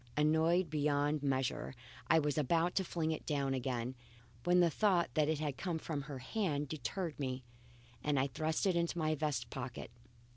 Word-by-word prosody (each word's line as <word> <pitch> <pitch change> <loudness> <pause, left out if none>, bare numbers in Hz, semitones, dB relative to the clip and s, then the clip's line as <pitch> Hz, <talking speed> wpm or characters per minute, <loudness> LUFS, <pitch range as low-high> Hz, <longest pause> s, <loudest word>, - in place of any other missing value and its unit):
Annoyed 160 +3 +3
beyond 145 0 +1
measure, 130 -2 -1 0.3
I 165 - +5
was 150 -2 +1
about 165 +4 +2
to 190 - +2
fling 165 -3 -1
it 155 - -3
down 140 -3 +1
again, 125 -1 -2 0.5
when 180 0 +5
the 170 -2 +5
thought 185 -2 +2
that 155 -1 +3
it 160 - +1
had 145 -3 -2
come 175 -4 -2
from 155 -2 -3
her 140 0 -6
hand 145 - -1
deterred 155 - -3
me, 130 -2 -2 0.6
and 145 -2 +2
I 130 - +3
thrust 155 +5 -1
it 190 -3 +3
into 170 0 0
my 155 -1 +1
vest 150 -1 -2
pocket. 125 -3 -5
150 Hz, 180 wpm, -35 LUFS, 140-165 Hz, 0.6 s, I